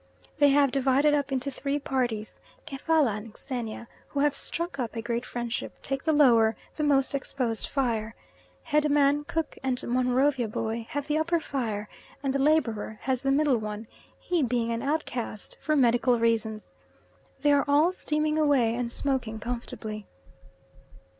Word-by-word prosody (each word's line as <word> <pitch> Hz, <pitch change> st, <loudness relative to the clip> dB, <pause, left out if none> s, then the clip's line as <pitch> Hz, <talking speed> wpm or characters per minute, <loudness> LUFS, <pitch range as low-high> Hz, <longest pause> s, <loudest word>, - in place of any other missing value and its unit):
They 290 Hz, -, +6 dB
have 280 Hz, -1 st, +4 dB
divided 275 Hz, +2 st, +3 dB
up 285 Hz, -1 st, 0 dB
into 265 Hz, +1 st, -1 dB
three 280 Hz, +2 st, -2 dB
parties: 245 Hz, -6 st, -2 dB, 0.3 s
Kefalla 285 Hz, -5 st, +1 dB
and 215 Hz, +1 st, -10 dB
Xenia, 235 Hz, -3 st, -5 dB, 0.2 s
who 280 Hz, -, -2 dB
have 290 Hz, -1 st, +3 dB
struck 335 Hz, +2 st, -1 dB
up 240 Hz, -2 st, -3 dB
a 225 Hz, -, -2 dB
great 235 Hz, +1 st, -2 dB
friendship, 240 Hz, -1 st, -4 dB
take 270 Hz, +1 st, -2 dB
the 320 Hz, -, +3 dB
lower, 235 Hz, -7 st, +5 dB, 0.2 s
the -, -, -3 dB
most 275 Hz, -2 st, +3 dB
exposed 255 Hz, -5 st, -2 dB
fire. 225 Hz, -5 st, -1 dB, 0.5 s
Head 300 Hz, -1 st, +1 dB
man, 290 Hz, 0 st, +3 dB
Cook, 325 Hz, +1 st, -3 dB
and 260 Hz, -2 st, 0 dB
Monrovia 255 Hz, +1 st, +2 dB
Boy 225 Hz, +1 st, -3 dB
have 290 Hz, -1 st, -3 dB
the 305 Hz, +1 st, 0 dB
upper 340 Hz, +2 st, +1 dB
fire, 225 Hz, -9 st, -3 dB, 0.4 s
and 270 Hz, -1 st, 0 dB
the 275 Hz, -, 0 dB
labourer 235 Hz, -8 st, +1 dB
has 260 Hz, -1 st, 0 dB
the 275 Hz, -, 0 dB
middle 275 Hz, -3 st, +3 dB
one 215 Hz, +1 st, -5 dB, 0.3 s
he 355 Hz, -3 st, 0 dB
being 240 Hz, -3 st, 0 dB
an 230 Hz, 0 st, -2 dB
outcast 260 Hz, -7 st, -3 dB
for 305 Hz, -, +1 dB
medical 245 Hz, -2 st, +3 dB
reasons. 225 Hz, -2 st, 0 dB, 0.7 s
They 290 Hz, -, +4 dB
are 285 Hz, -1 st, +4 dB
all 295 Hz, +5 st, +4 dB
steaming 305 Hz, -3 st, -1 dB
away 275 Hz, -7 st, +3 dB
and 240 Hz, 0 st, -2 dB
smoking 250 Hz, -5 st, 0 dB
comfortably. 220 Hz, -3 st, -5 dB
265 Hz, 160 wpm, -27 LUFS, 230-290 Hz, 0.7 s, They